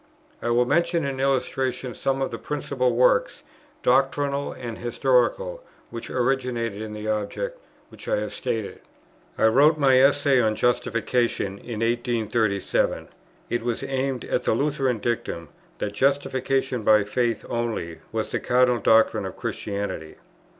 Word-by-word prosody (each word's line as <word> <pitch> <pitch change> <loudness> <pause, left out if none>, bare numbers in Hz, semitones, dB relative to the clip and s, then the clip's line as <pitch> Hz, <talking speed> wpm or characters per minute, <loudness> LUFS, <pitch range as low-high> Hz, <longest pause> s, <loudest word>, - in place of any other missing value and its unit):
I 120 - -2
will 120 +1 +3
mention 170 +3 +1
in 135 -1 -3
illustration 130 -2 -1
some 135 +2 -1
of - - -3
the - - -5
principal 130 -4 -1
works, 125 +1 +2 0.4
doctrinal 140 +2 +1
and 120 -3 -7
historical, - - +1 0.3
which 115 -1 -7
originated 125 -4 -1
in 110 -1 -6
the 105 0 -6
object 110 - -2 0.3
which - - -13
I - - +2
have - - -3
stated. 110 -3 -3 0.6
I - - +3
wrote 145 +8 +5
my 135 -3 +5
Essay 140 -1 +4
on 110 -2 +1
Justification 120 -4 0
in 115 -3 -6
1837; 115 -3 0 0.4
it 120 - 0
was 120 0 -2
aimed 135 -1 -2
at - - 0
the 110 - +1
Lutheran 135 -2 0
dictum 100 -8 -3 0.3
that 105 - -3
justification 135 0 0
by 105 0 +5
faith 115 +1 -1
only 115 -9 -3
was - - -3
the - - -1
cardinal 125 -1 +3
doctrine 110 0 +4
of - - -9
Christianity. 100 -6 -4
125 Hz, 140 wpm, -24 LUFS, 115-135 Hz, 0.6 s, wrote